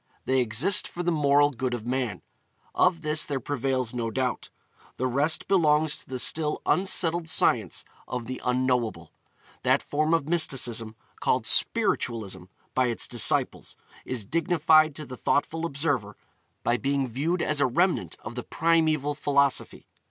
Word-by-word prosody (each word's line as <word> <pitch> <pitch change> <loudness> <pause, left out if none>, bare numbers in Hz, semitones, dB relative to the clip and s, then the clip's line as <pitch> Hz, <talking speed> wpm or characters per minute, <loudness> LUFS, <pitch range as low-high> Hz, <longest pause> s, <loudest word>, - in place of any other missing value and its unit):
They 130 0 +2
exist 125 - +2
for 175 - -6
the 175 - +1
moral 145 -2 +3
good 125 -1 -3
of 115 -2 -8
man; 125 -6 -3 0.5
of 165 - +2
this 150 +1 +2
there 140 -2 -2
prevails 130 -2 -2
no 115 -2 -2
doubt. 125 +2 -3 0.5
The 130 - -1
rest 140 +5 +1
belongs 155 -5 +2
to - - -18
the 130 - -4
still 150 +4 +2
unsettled 175 -3 +1
science 110 - +1 0.2
of 125 -2 -4
the 130 +2 -6
Unknowable. 125 -2 -1 0.5
That - - +2
form 155 +3 +1
of 150 -4 -2
mysticism 125 -9 0 0.2
called - - 0
'spiritualism' 100 -6 +1 0.3
by 130 -1 +2
its 120 - -2
disciples 120 -2 0 0.3
is 125 -5 -5
dignified 160 - +3
to 150 - -7
the 130 -2 -9
thoughtful 165 +3 -1
observer 140 -9 -2 0.5
by 120 - +1
being 135 +1 -1
viewed 155 +9 -1
as 150 -1 0
a - - +4
remnant 175 +9 0
of 110 - -7
the 125 - -5
primeval 160 -3 +1
philosophy. 140 -2 0
140 Hz, 150 wpm, -26 LUFS, 125-155 Hz, 0.5 s, a